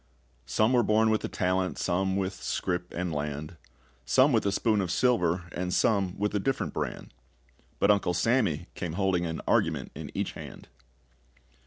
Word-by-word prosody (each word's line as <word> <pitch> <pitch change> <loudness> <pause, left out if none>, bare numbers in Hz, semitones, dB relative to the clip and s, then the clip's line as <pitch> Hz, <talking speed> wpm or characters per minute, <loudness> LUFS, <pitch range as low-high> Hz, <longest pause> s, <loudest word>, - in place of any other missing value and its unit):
Some 110 - +2
were 125 - +5
born 110 0 +3
with 110 - 0
a - - -1
talent, 95 0 -1
Some 95 +1 0
with 95 0 -1
scrip 90 -1 -3
and 85 -1 -3
land; 75 +2 -4 0.5
Some 130 - +4
with 110 -3 +2
a - - +2
spoon 105 +1 +1
of 95 - -2
silver, 90 -6 +2
And 90 0 -3
some 95 -1 +1
with 105 +1 -1
a 105 - +1
different 135 +7 -1
brand; - - -4 0.6
But 100 - +4
Uncle 100 -4 +1
Sammy 95 - +1
came 85 -4 -4
holding 95 -2 +1
an 80 0 -4
argument - - +1
in - - -7
each - - -1
hand. - - -10
95 Hz, 170 wpm, -28 LUFS, 90-110 Hz, 0.6 s, were